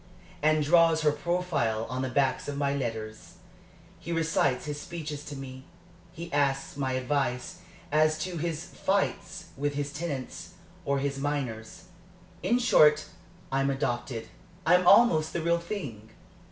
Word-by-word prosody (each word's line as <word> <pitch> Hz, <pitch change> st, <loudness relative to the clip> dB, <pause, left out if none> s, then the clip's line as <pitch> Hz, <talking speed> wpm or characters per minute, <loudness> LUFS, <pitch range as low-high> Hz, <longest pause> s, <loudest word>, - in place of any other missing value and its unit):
and 155 Hz, 0 st, +3 dB
draws 165 Hz, +1 st, +5 dB
her 150 Hz, -, +5 dB
profile 150 Hz, -9 st, -1 dB
on 130 Hz, +2 st, -3 dB
the 130 Hz, -, -1 dB
backs 130 Hz, +1 st, +1 dB
of 145 Hz, -1 st, -4 dB
my 140 Hz, -1 st, 0 dB
letters. 110 Hz, -4 st, -5 dB, 0.6 s
He 170 Hz, -, -7 dB
recites 160 Hz, -6 st, +1 dB
his 145 Hz, -1 st, -4 dB
speeches 155 Hz, -5 st, -6 dB
to 145 Hz, -, -7 dB
me; 130 Hz, -1 st, -8 dB, 0.5 s
he 170 Hz, 0 st, -8 dB
asks 140 Hz, -1 st, 0 dB
my 135 Hz, -2 st, -1 dB
advice 130 Hz, -1 st, -1 dB, 0.3 s
as 155 Hz, +1 st, +3 dB
to 180 Hz, -2 st, -4 dB
his 165 Hz, +1 st, -3 dB
fights 190 Hz, -2 st, -2 dB
with 145 Hz, +1 st, -2 dB
his 145 Hz, 0 st, -3 dB
tenants 145 Hz, -5 st, -5 dB, 0.3 s
or 140 Hz, -1 st, +1 dB
his 140 Hz, 0 st, -2 dB
miners. 135 Hz, -6 st, -3 dB, 0.6 s
In 240 Hz, -, +2 dB
short, 150 Hz, -11 st, +5 dB, 0.4 s
I'm 135 Hz, +1 st, +1 dB
adopted 120 Hz, -4 st, -2 dB, 0.4 s
I'm 180 Hz, +2 st, +4 dB
almost 175 Hz, -8 st, +6 dB
the 170 Hz, -, -1 dB
real 170 Hz, +1 st, +2 dB
thing." 140 Hz, -, -6 dB
145 Hz, 140 wpm, -28 LUFS, 135-165 Hz, 0.6 s, almost